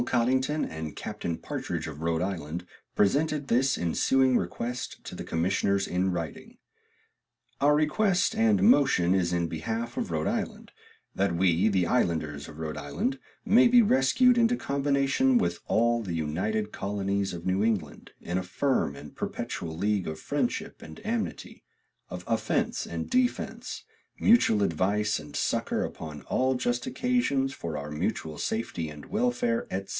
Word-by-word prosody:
Cottington 130 +5 +1
and 80 -1 -6
Captain 85 -1 -4
Partridg - - -4
of 75 -1 -7
Rhoode 80 +1 0
Island 90 -2 -4 0.3
presented 145 +7 +1
this 130 +3 +3
insewing 130 +9 +2
request 120 +7 -3
to - - -8
the - - -6
commissioners 95 +3 0
in 90 +2 0
wrighting 85 -4 -5 1.0
"Our 145 +1 +5
request 175 +5 +2
and 105 -4 +3
motion 95 -10 +5
is 90 -3 +1
in 85 -1 0
behalfe 110 +9 -4
of - - -2
Rhoode 80 -1 -1
Iland, - - -3 0.4
that 95 -3 0
wee 90 +2 +3
the 95 -4 +2
ilanders 80 -9 0
of 75 - -11
Rhoode 80 -1 -4
Iland 75 - -2 0.3
may 240 +4 +6
be 240 0 +7
rescauied 215 - +4
into 235 +1 +4
combination 140 - +2
with 230 - 0
all 120 +1 +2
the 90 -6 -4
united 100 +8 -1
colonyes 100 0 -2
of 85 0 -7
New 95 +2 +1
England 100 -10 -2
in 90 +2 -2
a - - -4
firme 90 - 0
and 75 +1 -11
perpetual 80 -1 -4
league 100 0 0
of 80 0 -5
friendship - - -2
and 80 - -10
amity 225 0 -3 0.5
of - - -7
ofence - - 0
and - - -3
defence, 250 -1 -1 0.4
mutuall 160 - +5
advice 100 +4 +1
and 75 -1 -11
succor - - 0
upon 75 -2 -7
all 130 - +1
just 120 -1 -1
occasions 140 - +1
for 85 -8 -5
our 70 +1 -5
mutuall 75 +1 -3
safety 90 -8 -2
and 75 -1 -10
wellfaire, 235 +2 0
etc. 95 +1 -3
100 Hz, 150 wpm, -28 LUFS, 85-135 Hz, 1.0 s, be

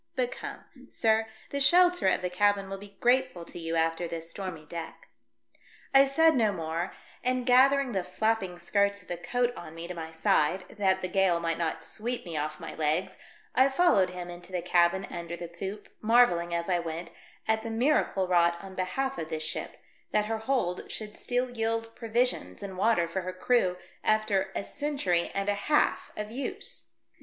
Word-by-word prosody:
But - - 0
come, - - -7 0.3
sir, 220 -1 +2 0.2
the 280 - -1
shelter 355 - +5
of 185 - +2
the 180 - 0
cabin 200 +1 +2
will 195 - -4
be 200 0 -13
grateful 245 -8 +2
to 175 - -7
you 165 0 -3
after 165 +1 +1
this 165 0 -5
stormy 185 -6 -6
deck." 165 +1 -8 0.8
I 270 0 +8
said 320 +4 +4
no 220 -4 +3
more, 165 -1 -3 0.3
and 255 0 0
gathering 265 +1 +5
the 190 -4 -1
flapping 190 0 -1
skirts 200 +2 +1
of - - -22
the 175 - -2
coat 245 +8 0
on 155 - -9
me 165 +1 -6
to 180 - -5
my 165 -2 -6
side, 160 +2 +1
that 190 -1 +2
the 185 - -1
gale 185 -2 +2
might 165 -1 -1
not 165 -2 -1
sv/eep 240 +3 -4
me 170 -2 -6
off 155 0 -2
my - - -7
legs, 155 +3 -1 0.3
I 260 +2 +5
followed 270 - +4
him 180 -1 -6
into 175 +1 -11
the 180 -2 -2
cabin 180 +2 +3
under 170 0 -5
the 170 - -6
poop, 190 +5 -6
marvelling, 215 -7 +4
as 170 0 -1
I 180 -2 +2
went, 170 0 -5 0.4
at 220 0 +2
the 230 - -5
miracle 225 -5 +2
wrought 170 -1 +3
on 190 +1 -10
behalf 265 +9 -2
of 160 - -4
this 155 -1 -2
ship, 155 - -4 0.3
that 210 0 +2
her 220 +1 -2
hold 220 -7 -1
should 210 -1 -6
still 250 0 -1
yield 225 -1 -2
provisions 230 - -1
and 195 -2 -6
water 195 -3 +2
for 190 +3 -3
her 185 0 -5
crew 185 -2 +2 0.3
after 215 -3 +2
a - - -1
century 275 - -1
and 195 0 -1
a 205 - +3
half 250 +9 +1
of 210 0 -4
use. 265 +4 -5
195 Hz, 190 wpm, -29 LUFS, 170-230 Hz, 0.8 s, I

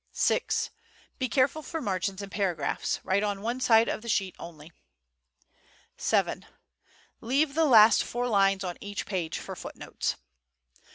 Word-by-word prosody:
VI. - - +3 0.8
Be 255 -1 -1
careful 270 +5 +2
for 325 +1 -5
margins 195 - -2
and 200 - -9
paragraphs. 195 -5 -1
Write 190 +2 +1
on 205 -1 -2
one 240 +3 -2
side 230 -2 +5
of - - -2
the 235 - -8
sheet 195 -4 0
only. 160 -1 -11 1.3
VII. - - 0 0.8
Leave 275 +5 +1
the 320 +2 +3
last 225 -5 +7
four 245 +1 -3
lines 195 -3 +2
on 180 -2 -5
each 205 0 -5
page 175 -5 -3
for - - -7
footnotes. - - -4
205 Hz, 145 wpm, -28 LUFS, 190-245 Hz, 1.3 s, last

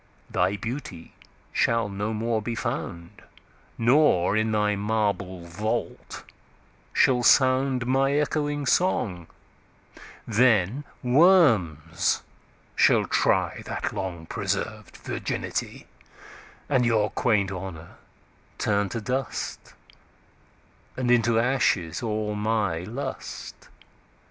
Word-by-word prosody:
Thy 95 +3 +1
Beauty 115 - -7 0.4
shall 115 -2 +2
no 100 +2 -3
more 110 0 -1
be 115 +2 -4
found; 85 -5 -5 0.6
Nor, 115 - +3
in 110 0 +1
thy 105 -1 +1
marble 100 -4 -2
Vault, 105 +6 -4 0.7
shall 125 -2 +3
soundMy 130 +2 +3
ecchoing 145 -1 -1
Song: 95 - +1 1.0
then 115 +2 +2 0.2
Worms 120 - +3 0.5
shall - - +4
tryThat - - 0
long 90 -4 -5
preserv'd - - -4
Virginity:And 130 -4 -5
your 110 -3 +2
quaint 105 -5 +1
Honour 90 -3 -8 0.6
turn 100 -1 0
to 115 - -4
dust; 130 +5 -4 1.2
And 125 -1 0
into 120 -1 +3
ashes 115 -8 +1
all 110 -2 -2
my 105 -5 0
Lust. 115 +11 -7
110 Hz, 85 wpm, -25 LUFS, 95-125 Hz, 1.2 s, shall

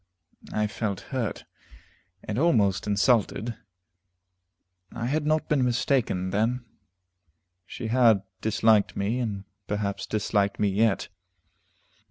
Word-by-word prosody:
I 105 - 0
felt 105 -2 -3
hurt, 120 -5 -2 0.8
and 105 +3 -3
almost 110 - +2
insulted. 110 +1 +1 1.4
I 115 - -4
had 150 +4 0
not 155 0 +1
been 145 -4 +2
mistaken, 120 -6 0
then; 115 +5 0 1.0
she 110 - -6
had 115 -5 +4 0.2
disliked 110 -1 +3
me, 105 +5 0
and 105 -5 -3 0.2
perhaps 100 -1 -2
disliked 100 -1 0
me 105 - +2
yet. 105 0 +1
110 Hz, 105 wpm, -26 LUFS, 100-125 Hz, 1.4 s, had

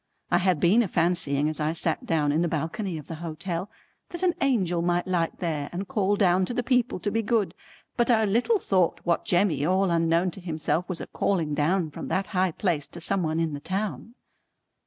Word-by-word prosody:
I - - +4
had 180 -4 +2
been 195 +9 +4
a 225 - 0
fancying 165 -5 +1
as 155 0 -3
I 155 +1 0
sat 165 - +1
in 155 -1 +2
the 175 - +1
balcony 165 +4 -3
of 150 - -9
the - - -7
hotel 175 +3 -4 0.4
that 345 +1 -5
an 360 -2 +3
Angel 190 -11 +1
might 175 +1 +1
light 175 -3 -1
there 155 -5 -2
and 185 +3 -4
call 205 0 +1
down 185 -2 +3
to 240 - -5
the 245 - 0
people 250 -5 +1
to 205 - -1
be 225 +2 +1
good, 210 -5 0 0.4
but 240 0 +2
I 220 -2 +4
little 235 - +2
thought 185 - +1
what 170 -1 0
Jemmy 175 -6 +2
all 185 +3 +2
unknown 165 +2 +2
to 190 - -10
himself 165 +1 -1
was 180 -3 -4
a - - -4
calling 165 -7 -1
down 160 +2 +1
from - - -7
that 195 - 0
high 185 0 +2
place 165 -5 -1
to 170 - -10
some 195 +3 +1
one 160 -1 -1
in 165 -2 0
the 145 - -4
town. 210 +7 -4
175 Hz, 215 wpm, -26 LUFS, 165-200 Hz, 0.4 s, I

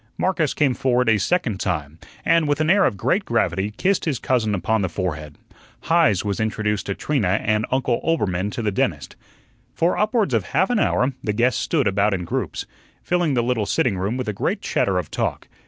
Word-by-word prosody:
Marcus 170 -6 0
came 140 -4 +2
forward 125 0 +1
a 110 -2 +4
second 120 - 0
time, 75 -3 -3 0.3
and, 165 -2 +3
with 145 +1 0
an 155 +1 +3
air 200 0 +4
of 100 - 0
great - - +1
gravity, 95 +2 0
kissed 190 +6 +1
his 150 -6 0
cousin 115 -4 0
upon 105 +4 0
the 95 - -1
forehead. 80 -5 -4 0.4
Heise 160 - +2
was 100 -2 -2
introduced 105 -1 -1
to 100 - -2
Trina 105 -10 0
and 110 +1 +1
Uncle 130 -2 0
Oelbermann 100 - 0
to 120 - -4
the 105 - 0
dentist. 95 - -2 0.6
For 170 +4 +1
upwards 210 - +1
of 110 -4 +2
half 185 - +1
an 240 - +2
hour 130 -7 +1
the 105 - -1
guests 120 +4 +1
stood 150 -6 0
about 100 +1 +2
in 90 -2 -4
groups, - - -3 0.4
filling 175 -5 +1
the 120 - +2
little 115 -4 0
sitting 120 -6 +1
room 100 +6 -2
with 130 -2 -4
a 105 - -1
great - - -1
chatter 95 -2 0
of 90 -4 -3
talk. - - -2
115 Hz, 205 wpm, -22 LUFS, 100-150 Hz, 0.6 s, a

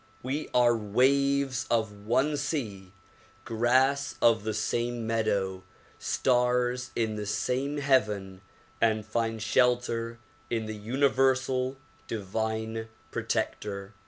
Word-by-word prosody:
We 140 +5 -3
are 120 -1 +4
waves 130 +4 +2
of 105 -3 -1
one 135 +6 +2
sea, 110 - -3 0.5
grass 130 +4 +2
of 115 -3 +4
the 110 0 -2
same 120 +1 -1
meadow, 100 -4 0 0.4
stars 125 -1 +1
in 110 -2 0
the 105 -1 -4
same 135 +7 -1
heaven 105 -9 +1 0.4
and 110 -2 +2
find 115 0 -1
shelter 115 0 +1 0.3
in 115 -1 -1
the 110 - -4
universal 130 +2 +1 0.3
divine 110 +2 -3 0.2
protector. 100 0 -3
115 Hz, 100 wpm, -28 LUFS, 110-130 Hz, 0.5 s, are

